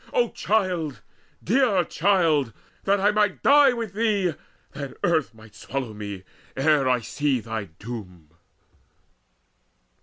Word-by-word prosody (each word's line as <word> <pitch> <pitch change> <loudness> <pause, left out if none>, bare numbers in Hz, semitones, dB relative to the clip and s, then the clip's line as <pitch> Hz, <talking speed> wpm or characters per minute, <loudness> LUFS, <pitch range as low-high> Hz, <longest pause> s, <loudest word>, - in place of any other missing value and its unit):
O - - +2
child, 180 - -1 0.4
dear 225 -4 +3
child, 160 - +1 0.3
that 200 +1 +3
I 205 +2 +3
might 210 -1 0
die 285 -1 +6
with 230 -5 -4
thee, 205 -5 +1 0.4
That 140 -1 -7
earth 160 -5 +1
might 110 -1 -16
swallow 125 +3 -5
me, 100 -3 -7 0.3
ere 140 -1 +3
I 125 -2 +2
see 140 +3 -1
thy 110 -2 -5
doom!" 90 -3 -10
150 Hz, 120 wpm, -24 LUFS, -, 0.4 s, die